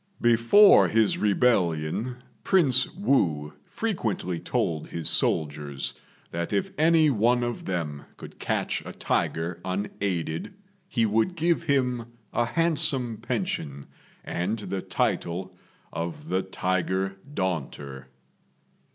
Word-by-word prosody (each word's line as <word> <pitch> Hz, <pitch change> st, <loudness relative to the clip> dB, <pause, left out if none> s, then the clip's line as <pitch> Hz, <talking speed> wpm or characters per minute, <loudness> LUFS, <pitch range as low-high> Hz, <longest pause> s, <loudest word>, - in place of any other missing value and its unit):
Before 120 Hz, -, +6 dB
his 110 Hz, -1 st, +2 dB
rebellion, 105 Hz, -1 st, +1 dB, 0.3 s
Prince 135 Hz, -9 st, +3 dB
Wu 80 Hz, -, +1 dB
frequently 110 Hz, -, -2 dB
told 80 Hz, -1 st, -1 dB
his 85 Hz, -2 st, -3 dB
soldiers 75 Hz, -3 st, 0 dB, 0.4 s
that 85 Hz, 0 st, -3 dB
if 100 Hz, -1 st, 0 dB
any 160 Hz, -1 st, +4 dB
one 120 Hz, +1 st, +2 dB
of 120 Hz, -1 st, -3 dB
them 80 Hz, -6 st, -3 dB
could -, -, -11 dB
catch -, -, -1 dB
a -, -, -8 dB
tiger 85 Hz, +1 st, -1 dB
unaided 95 Hz, -, -3 dB, 0.3 s
he 120 Hz, -11 st, +1 dB
would 110 Hz, -, +1 dB
give 170 Hz, +1 st, +1 dB
him 125 Hz, -6 st, 0 dB, 0.2 s
a 120 Hz, -, +2 dB
handsome 135 Hz, -6 st, +1 dB
pension 105 Hz, -, -3 dB, 0.4 s
and 95 Hz, +6 st, -2 dB
the 100 Hz, -3 st, -4 dB
title 90 Hz, +2 st, -1 dB, 0.4 s
of 85 Hz, -, -5 dB
the 95 Hz, -, +1 dB
Tiger 95 Hz, +1 st, -1 dB, 0.2 s
Daunter. 70 Hz, -, -4 dB
100 Hz, 110 wpm, -26 LUFS, 85-125 Hz, 0.4 s, Before